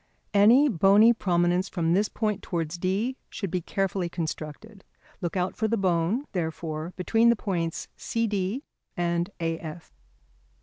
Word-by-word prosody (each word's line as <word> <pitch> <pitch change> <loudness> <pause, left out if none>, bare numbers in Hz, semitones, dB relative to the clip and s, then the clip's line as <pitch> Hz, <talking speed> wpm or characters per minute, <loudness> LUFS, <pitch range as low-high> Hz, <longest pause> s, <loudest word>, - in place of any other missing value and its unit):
Any 230 +8 +6
bony 205 - +6
prominence 180 -2 +1
from 165 -2 0
this 205 +3 +2
point 210 -2 -1
towards 170 -1 -3
D 205 +9 -1
should 195 -5 -5
be 180 - -1
carefully 190 0 -1
constructed. 170 +5 -6 0.4
Look 175 +1 -2
out 180 +1 -1
for 220 - 0
the 230 +1 0
bone, 185 - +1
therefore, 160 -2 -3
between 225 +5 +3
the 235 - +5
points 170 -6 -3
CD 215 +2 -1 0.3
and 170 +1 0
AF. 165 0 -5
185 Hz, 135 wpm, -26 LUFS, 170-210 Hz, 0.4 s, Any